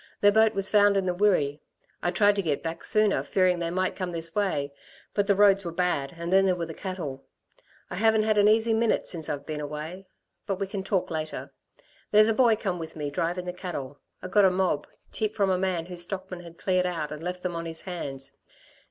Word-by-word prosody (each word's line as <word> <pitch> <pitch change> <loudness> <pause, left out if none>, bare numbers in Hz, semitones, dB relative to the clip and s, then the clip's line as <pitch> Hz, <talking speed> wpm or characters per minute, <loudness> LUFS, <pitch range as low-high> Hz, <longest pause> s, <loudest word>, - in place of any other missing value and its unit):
Their 205 - +6
boat 220 +1 +4
was 195 -1 +1
found 205 0 +4
in 195 - +1
the 180 - +1
Wirree. 175 -7 +2 0.4
I 175 - 0
tried 205 +3 +3
to - - +2
get 155 -6 -1
back 165 0 -5
sooner, 215 -2 +3
fearing 185 -2 +2
they 170 -1 -2
might 185 +2 -1
come 185 -2 -3
this 165 -1 -4
way, 150 -9 -1 0.4
but 205 -1 +1
the 200 - +4
roads 200 -1 +5
were 170 - -4
bad 170 -5 -1
and 170 +2 -3
then 195 0 +5
there 185 - +3
were 170 -1 -3
the 165 - -7
cattle. 160 -8 -5 0.7
I 180 - -4
haven't 220 +1 +3
had 215 -1 +2
an 205 - +5
easy 225 +1 +4
minute 225 0 +1
since 160 -4 -3
I've 145 -1 -4
been 155 -1 -4
away. 155 +6 -6 0.4
But 195 -1 -2
we 195 - 0
can 195 0 -5
talk 190 -2 -1
later. 155 -1 -4 0.6
There's 215 +1 +6
a - - +3
boy 235 -1 +4
come 190 -5 -3
with 160 -1 -7
me, 145 -2 -4
drivin' 175 +5 -2
the 180 - -4
cattle. 145 -7 -6 0.2
I - - -4
got 205 +2 +4
a 190 - +7
mob, 180 -5 0 0.2
cheap, 215 0 -2
from 200 -3 +2
a 185 - +2
man 185 -3 -1
whose 175 -1 -5
stockmen 185 0 -5
had 170 -1 -12
cleared 185 -1 +1
out 165 -4 -3
and 150 0 -6
left 180 +1 -5
them 180 -2 -2
on 165 0 -4
his 165 0 -6
hands. 135 -8 -6
180 Hz, 230 wpm, -27 LUFS, 165-200 Hz, 0.7 s, a